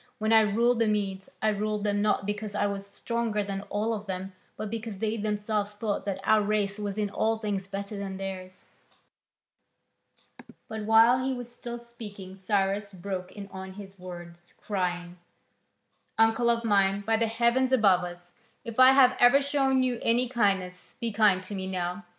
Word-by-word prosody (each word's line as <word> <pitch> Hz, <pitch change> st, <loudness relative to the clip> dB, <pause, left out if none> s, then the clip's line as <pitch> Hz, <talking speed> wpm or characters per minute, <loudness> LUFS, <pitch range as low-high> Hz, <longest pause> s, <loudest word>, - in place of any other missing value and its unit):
When 220 Hz, 0 st, +1 dB
I 220 Hz, -, +8 dB
ruled 230 Hz, +3 st, +2 dB
the 230 Hz, -, +3 dB
Medes, 195 Hz, -2 st, -2 dB
I 215 Hz, -, +4 dB
ruled 210 Hz, 0 st, -1 dB
them 205 Hz, -1 st, +1 dB
not 210 Hz, -1 st, +1 dB
because 205 Hz, 0 st, -4 dB
I 205 Hz, -, +1 dB
was 200 Hz, -1 st, -3 dB
stronger 225 Hz, 0 st, -2 dB
than 195 Hz, -1 st, -4 dB
all 215 Hz, +2 st, 0 dB
of 210 Hz, -1 st, -5 dB
them, 190 Hz, 0 st, -5 dB, 0.2 s
but 215 Hz, -1 st, -5 dB
because 225 Hz, -2 st, -5 dB
they 220 Hz, +2 st, -1 dB
themselves 210 Hz, -1 st, -2 dB
thought 205 Hz, -1 st, -2 dB
that 195 Hz, -1 st, -2 dB
our 215 Hz, +1 st, +4 dB
race 205 Hz, -1 st, 0 dB
was 205 Hz, -1 st, -4 dB
in 205 Hz, -2 st, -1 dB
all 225 Hz, +2 st, +1 dB
things 205 Hz, -3 st, -3 dB
better 200 Hz, +1 st, -5 dB
than 195 Hz, -1 st, -5 dB
theirs." 185 Hz, -1 st, -7 dB, 2.0 s
But 220 Hz, -1 st, -5 dB
while 230 Hz, +3 st, +5 dB
he 265 Hz, 0 st, -1 dB
was 245 Hz, -1 st, -7 dB
still 240 Hz, 0 st, -6 dB
speaking 210 Hz, -5 st, -10 dB
Cyrus 195 Hz, +1 st, -1 dB
broke 185 Hz, 0 st, -5 dB
in 200 Hz, -1 st, -8 dB
on 190 Hz, 0 st, -8 dB
his 195 Hz, -1 st, -11 dB
words, 175 Hz, -1 st, -11 dB
crying: 180 Hz, -3 st, -3 dB, 1.0 s
"Uncle 225 Hz, +2 st, +3 dB
of 235 Hz, 0 st, +1 dB
mine, 200 Hz, -2 st, +3 dB
by 225 Hz, +2 st, +1 dB
the 225 Hz, +1 st, +1 dB
heaven 235 Hz, +3 st, +2 dB
above 200 Hz, -8 st, +4 dB
us, 175 Hz, 0 st, -9 dB, 0.3 s
if 230 Hz, +1 st, -6 dB
I 260 Hz, +1 st, +9 dB
have 255 Hz, -2 st, +6 dB
ever 245 Hz, +3 st, +7 dB
shown 275 Hz, -2 st, +2 dB
you 250 Hz, -2 st, -1 dB
any 240 Hz, +2 st, +2 dB
kindness, 195 Hz, -7 st, -1 dB
be 235 Hz, -2 st, -2 dB
kind 205 Hz, -3 st, +3 dB
to 185 Hz, -, -7 dB
me 190 Hz, -1 st, -4 dB
now. 180 Hz, +1 st, -3 dB
210 Hz, 180 wpm, -28 LUFS, 195-225 Hz, 2.0 s, I